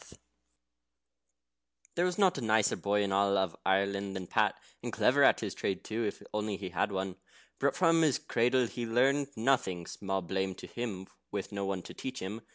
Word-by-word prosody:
] - - -40
There 175 - +1
was 180 -1 -1
not 190 -7 +3
a - - -5
nicer 110 -2 +3
boy 105 0 +1
in 100 - -1
all 100 -2 +2
Ireland 100 0 +1
than 95 -1 -4
Pat, - - +2 0.3
and - - -4
clever - - +3
at - - +5
his - - -3
trade 95 - -2
too, 110 +2 -2
if 105 - -4
only 105 -1 -1
he'd 95 -2 -6
had 90 +4 0
one. 95 -1 -3 0.4
But 140 0 +2
from 165 -2 +4
his 150 -5 +3
cradle 125 +2 +2
he 120 0 -4
learned 135 +5 +3
nothing 110 -8 +1
(small 95 0 -3
blame 95 +1 -2
to - - -10
him 105 -6 -5 0.2
with - - -4
no 100 -1 -2
one 95 -2 -2
to - - -9
teach 130 0 -5
him!) 105 +5 -5
100 Hz, 190 wpm, -31 LUFS, 95-120 Hz, 0.4 s, at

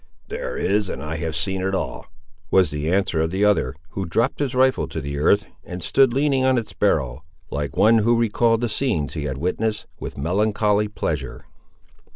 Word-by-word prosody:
"There - - -4
is, 100 +1 +1
and 65 - -5
I 80 +1 -4
have 80 0 -3
seen 95 +3 -1
it 95 +1 0
all," - - -4 0.4
was 95 -6 +4
the 75 +2 -2
answer 95 -4 +1
of 80 - 0
the 95 +4 +1
other, 80 -11 +2
who 95 0 -4
dropped 115 +10 0
his 140 -3 -1
rifle 130 0 +3
to - - -5
the 70 +1 -4
earth, 100 +8 +3 0.2
and 90 -1 -7
stood 135 -3 +4
leaning 135 0 +2
on 130 -1 +3
its 115 -3 -3
barrel, 75 -8 0 0.3
like 70 -1 -3
one 115 +1 +5
who 115 +3 +3
recalled 115 0 +2
the 120 - +1
scenes 105 - -1
he 75 -3 -4
had 65 -2 -3
witnessed 105 +7 -1
with - - -7
melancholy 105 +6 +1
pleasure. 75 -9 -4
95 Hz, 195 wpm, -22 LUFS, 80-115 Hz, 0.4 s, one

